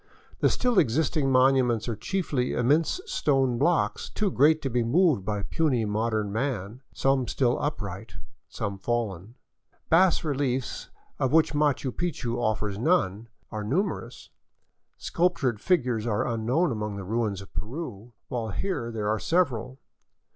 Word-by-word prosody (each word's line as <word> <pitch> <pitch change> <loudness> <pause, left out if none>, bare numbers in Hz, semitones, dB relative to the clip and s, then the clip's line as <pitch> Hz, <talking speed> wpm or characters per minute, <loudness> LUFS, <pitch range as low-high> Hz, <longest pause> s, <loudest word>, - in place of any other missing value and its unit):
The - - +4
still 245 -5 +2
existing 140 +1 +1
monuments 130 -3 +3
are 115 - -2
chiefly 140 - -1
immense 150 - +2
stone 135 - +1
blocks 170 +4 +1
too 210 -3 -1
great 155 +3 +4
to 135 - -1
be 120 +1 +1
moved 150 - +3
by 105 0 -2
puny 125 - +1
modern 110 0 -1
man, 115 -1 -3
some 135 -2 +1
still 125 -2 +1
upright, 105 -8 -4 0.3
some 100 -1 -4
fallen. 110 -2 -3 0.6
Bas 175 +1 +4
reliefs, 135 -4 -2 0.3
of 130 - +1
which 160 0 +4
Machu 145 -3 +1
Picchu 135 -7 -3
offers 105 -3 -1
none, 115 - +1 0.2
are 110 -1 -4
numerous; 165 - -3 0.7
sculptured 145 -11 0
figures 125 - +1
are 105 -3 0
unknown 120 +8 +1
among 105 -2 -3
the 100 - -6
ruins 110 -1 -1
of 100 - -12
Peru, 120 -3 -6
while 115 -3 -3
here 120 - -3
there 110 -2 -3
are 110 +1 +1
several. 130 - 0
125 Hz, 140 wpm, -27 LUFS, 110-150 Hz, 0.7 s, The